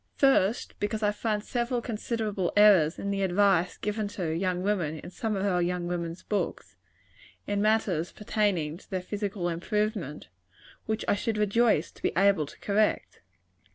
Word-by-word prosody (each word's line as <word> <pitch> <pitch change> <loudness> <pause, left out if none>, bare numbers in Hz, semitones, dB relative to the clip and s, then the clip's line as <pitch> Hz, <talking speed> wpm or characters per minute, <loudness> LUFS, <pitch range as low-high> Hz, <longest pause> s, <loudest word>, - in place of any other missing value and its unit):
First, 245 -6 +2
because 215 +1 -2
I 210 - +3
find 210 0 -2
several 240 +1 -1
considerable 215 -4 -2
errors 190 -7 +6
in 200 - -3
the 200 0 -1
advice 185 -2 +2
given 210 0 -2
to 165 -4 -1
young 180 +1 -1
women 180 -7 0
in 165 - -9
some 220 +2 -2
of 195 0 -1
our 180 -3 +2
young 175 0 -1
women's 170 0 -4
books, 180 - -3 0.7
in 200 0 -1
matters 205 -6 +1
pertaining 195 -7 -1
to - - -19
their 185 -2 -3
physical 200 -2 -3
improvement, 175 - -2 0.6
which 220 0 -2
I - - +4
should 215 +2 -1
rejoice 210 -4 +2
to - - -20
be - - 0
able 195 -6 +3
to - - -14
correct. 210 +1 0
200 Hz, 160 wpm, -28 LUFS, 175-215 Hz, 0.7 s, errors